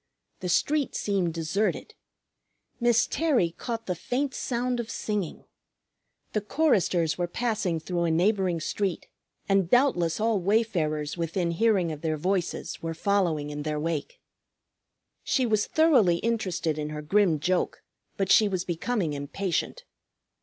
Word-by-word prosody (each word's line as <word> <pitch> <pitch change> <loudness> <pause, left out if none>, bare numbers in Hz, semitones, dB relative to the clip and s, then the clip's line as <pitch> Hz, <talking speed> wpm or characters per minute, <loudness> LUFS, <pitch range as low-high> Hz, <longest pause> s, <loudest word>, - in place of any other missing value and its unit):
The 180 - -4
street 285 - +1
seemed 185 -5 0
deserted. 170 +6 -1 0.9
Miss 240 -1 +4
Terry 275 - +1
caught 230 +5 -5
the 185 - -1
faint 260 +9 -2
sound 245 0 -1
of 235 -1 -4
singing. 210 -8 -3 0.9
The 215 - +1
choristers 190 - +1
were 175 - 0
passing 210 -4 -1
through 170 +1 -2
a - - +1
neighboring 180 +1 +2
street, 190 +3 -2 0.4
and 195 -3 +2
doubtless 200 - +3
all 220 -1 +2
wayfarers 175 -7 0
within 170 +1 -1
hearing 185 -2 +2
of 150 -1 -7
their 160 -2 -1
voices 180 +2 -2
were 165 0 -4
following 165 -6 0
in 145 0 -5
their 150 0 -2
wake. 155 -2 -3 1.0
She 260 -3 +1
was 215 -3 +1
thoroughly 265 - +4
interested 185 -8 -1
in 150 0 -3
her 150 0 -6
grim 180 -1 +3
joke, 180 +4 -1 0.3
but 195 -1 0
she 215 - +6
was 185 -2 -2
becoming 175 -1 -1
impatient. 155 +5 -3
185 Hz, 140 wpm, -27 LUFS, 165-220 Hz, 1.0 s, she